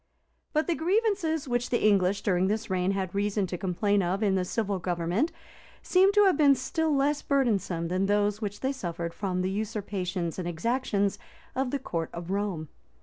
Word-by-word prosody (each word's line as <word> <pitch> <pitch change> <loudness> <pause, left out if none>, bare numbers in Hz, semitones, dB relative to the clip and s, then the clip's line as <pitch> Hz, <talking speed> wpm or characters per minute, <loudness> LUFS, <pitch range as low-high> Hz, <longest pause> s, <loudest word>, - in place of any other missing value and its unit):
[] - - -46
But 310 0 +2
the 345 - +1
grievances 355 -4 0
which 245 0 -1
the 240 - +1
English 200 -1 +2
during 185 -1 +2
this 215 0 -2
reign 185 +1 +1
had 190 -2 -3
reason 205 0 0
to 180 - -4
complain 195 +3 +1
of 190 +4 -1
in 200 -2 +3
the 190 -1 +1
civil 200 0 -1
government, 175 - 0 0.5
seem 380 +2 +4
to 415 0 +6
have 385 -4 +5
been 285 -2 +6
still 305 +4 0
less 285 +2 +1
burdensome 205 -11 0
than 185 +3 0
those 205 +1 +1
which 205 -1 -4
they 265 - 0
suffered 170 -9 -4
from 185 -2 -2
the 185 - -1
usurpations 195 -5 -3
and 175 - -3
exactions 200 +2 0 0.4
of 265 0 0
the 280 - -1
court 165 -11 -3
of 170 +1 -6
Rome. 195 -6 -2
205 Hz, 190 wpm, -28 LUFS, 185-265 Hz, 0.5 s, to